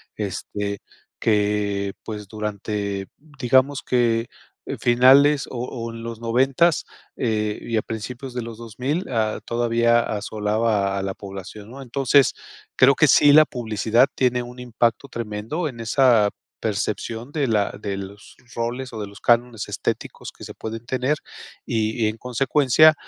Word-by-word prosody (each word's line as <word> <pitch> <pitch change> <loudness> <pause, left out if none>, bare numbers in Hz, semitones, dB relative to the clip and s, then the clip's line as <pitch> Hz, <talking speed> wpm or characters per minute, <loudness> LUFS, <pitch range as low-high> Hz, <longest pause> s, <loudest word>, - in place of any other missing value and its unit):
este, 100 0 -4 0.4
que 105 -2 +1
pues, 105 -2 -6
durante 100 -2 -3 0.3
digamos 130 +2 +3
que 120 -2 +1 0.5
finales 135 +4 +5
o 120 - -5
o 115 -2 -5
en 115 0 -8
los 115 -1 -6
noventas, 135 +8 +2 0.3
eh, 105 -3 -1
y 115 - -2
a 110 - +2
principios 125 +4 -6
de 125 - -3
los 115 -1 -8
2000, 125 - -3
a 110 -3 0
todavía 120 0 +2
asolaba 105 -1 -1
a 95 - -2
la 95 - -2
población, 100 +3 -9
¿no?, 135 +1 -9
entonces 135 +1 +3 0.4
creo 135 +2 +6
que 155 - +4
sí 145 +2 +6
la 155 +1 +8
publicidad 115 0 +1
tiene 125 -1 +1
un 125 +1 -10
impacto 120 +2 0
tremendo 115 +9 -3
en 120 -4 -11
esa 115 -3 +4 0.3
percepción 110 +3 -3
de 145 -3 0
la 105 -3 +1
de 100 -1 -3
los 100 +1 -10 0.2
roles 120 +3 -3
o 110 - -5
de 105 - -4
los 100 +1 -14
cánones 120 -2 +1
estéticos - - -4
que - - -11
se - - -8
pueden 115 +1 -6
tener 130 +4 0 0.5
y 110 -1 -1
y - - +3
en 110 - -6
consecuencia, 135 +5 +4
115 Hz, 150 wpm, -23 LUFS, 105-125 Hz, 0.5 s, la